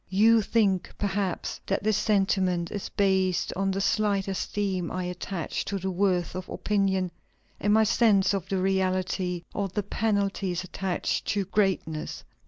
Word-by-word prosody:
You 220 +4 +5
think, 200 -3 +1
perhaps, 195 -3 -2
that 195 - 0
this 215 0 +2
sentiment 190 -5 +1
is 205 - -4
based 190 -3 +1
on 195 +1 0
the 195 0 -1
slight 200 -1 +1
esteem 190 -2 -2
I 185 0 -3
attach 180 -1 -3
to 200 - -2
the 190 0 -2
worth 180 -2 +1
of 185 0 -6
opinion, 190 -3 0 0.5
and 205 - +1
my 220 +1 +5
sense 205 -2 +4
of 195 -2 -3
the 195 - 0
reality 185 -1 0
of 195 -2 -2
the 205 - -1
penalties 200 -3 -1
attached 185 0 -2
to 205 -3 0
greatness. 190 -6 -1
195 Hz, 150 wpm, -27 LUFS, 185-200 Hz, 0.5 s, You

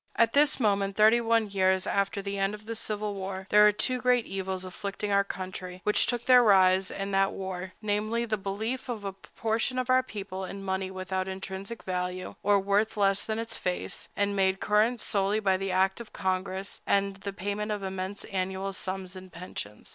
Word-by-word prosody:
At 230 -1 +3
this 290 0 +5
moment, 200 -3 +1
thirty 220 +3 +6
one 230 -1 +2
years 190 -1 +2
after 200 0 0
the 200 0 -3
end 195 +2 +1
of 210 +1 -15
our 230 - -3
civil 210 -1 -2
war, 190 -1 -5
there 210 0 +8
are - - +6
two 250 +4 -1
great 250 -2 +3
evils 190 -1 -3
afflicting 200 +2 -4
our 200 0 +4
country 185 -1 -6
which 210 - +3
took 240 -1 -1
their 250 -1 +8
rise 190 -3 +5
in 195 0 -4
that 195 0 +2
war, 185 -1 -5
namely, 215 +2 0
(1) 235 - -3
the 215 - +1
belief 220 +7 -3
of 225 -4 -4
a 200 - -2
large 195 - -34
proportion 225 +3 -1
of 255 0 0
our 255 0 +6
people 200 -6 -6
in 195 +1 -6
money 190 0 -2
without 185 0 -3
intrinsic 190 +3 -6
value, 180 0 -3
or 205 0 +4
worth 200 +3 +1
less 195 -1 +2
than 220 0 -2
its 225 0 -4
face, 180 -1 -3
and 200 0 +1
made 190 -1 +2
current 220 +4 +2
solely 200 0 +1
by 195 -3 +2 0.2
act 190 +3 +1
of 230 - -11
Congress, 190 +1 -2
and 200 -1 +1
(2) - - -23
the 200 - -4
payment 205 +3 -3
of 205 -1 -3
immense 190 +1 -4
annual 190 +1 -3
sums 190 -1 -4
in 185 0 -10
pensions. 170 - -7
195 Hz, 205 wpm, -28 LUFS, 190-215 Hz, 0.2 s, there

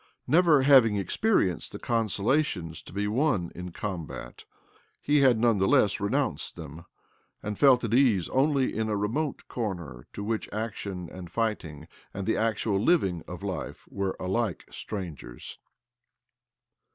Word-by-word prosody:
Never 160 -4 +5
having 130 -6 +6
experienced 100 - 0
the - - -4
consolations 110 - 0
to - - -13
be 100 +2 -2
won 110 - +1
'm 90 +1 -7
combat, 85 -11 -6 0.5
he 145 0 +2
had 130 -4 +5
none 115 -2 +3
the 95 - +3
less 100 +1 +3
renounced 100 0 -1
them, 80 +4 -9 0.6
and 105 0 -3
felt 130 +1 +5
at 115 -1 -1
ease 120 -9 +4
only 135 0 +2
in 110 0 -1
a 105 - 0
remote 125 +9 -2
corner 85 - -5
to 100 - -5
which 110 +1 -2
action 100 -4 -4
and 90 -1 -9
fighting 90 -9 -3 0.3
and 100 -1 -4
the 110 - +1
actual 110 -2 0
living 95 - +2
of - - -8
life - - -5
were 100 -1 -2
alike 95 0 -1
strangers. 85 - -7
105 Hz, 140 wpm, -27 LUFS, 90-125 Hz, 0.6 s, having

